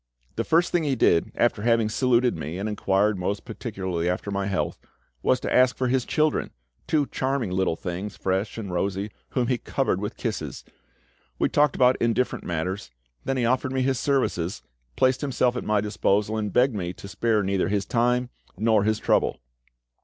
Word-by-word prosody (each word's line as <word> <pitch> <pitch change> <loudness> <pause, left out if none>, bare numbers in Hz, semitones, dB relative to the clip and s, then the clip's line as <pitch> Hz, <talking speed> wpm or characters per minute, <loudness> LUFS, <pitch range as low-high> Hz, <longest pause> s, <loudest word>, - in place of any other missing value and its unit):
The - - 0
first 170 +2 +2
thing 175 - +2
he 140 -3 +1
did, 85 -8 +3
after 120 -3 +1
having 115 -1 +3
saluted 125 +2 +2
me 80 +2 -5
and 100 +3 -3
inquired 105 -1 +1
most 100 +3 -2
particularly 95 -7 -3
after 90 +3 -2
my 100 0 -1
health, 95 -2 -2 0.4
was 125 - +2
to - - -2
ask 125 0 +4
for 130 -1 0
his 130 -1 +1
children, 155 -1 +1 0.4
two 150 -2 +2
charming 130 -6 -2
little 95 -2 +1
things, 90 +5 -5
fresh 95 +3 -1
and 100 -5 -5
rosy, 100 +3 -1 0.2
whom 125 -2 0
he 125 -1 0
covered 130 -8 -1
with 105 +3 -4
kisses. 80 - -4 0.7
We - - +1
talked 150 -2 +3
about 125 0 +3
indifferent 120 +2 0
matters, 85 -2 -3 0.4
then 135 - 0
he 120 - +1
offered 130 +2 +1
me 130 -1 +1
his 130 -1 +1
services, 115 - 0 0.3
placed 130 - +2
himself 130 -3 +1
at 125 - -3
my 105 -1 +1
disposal, 105 +1 0
and 105 -2 -2
begged 125 +4 +3
me 90 -4 -3
to 100 - -10
spare 105 +2 +1
neither 95 0 0
his 100 0 0
time 125 +1 +1 0.3
nor 110 -2 +3
his 110 +1 +1
trouble. - - +1
110 Hz, 185 wpm, -25 LUFS, 95-125 Hz, 0.7 s, ask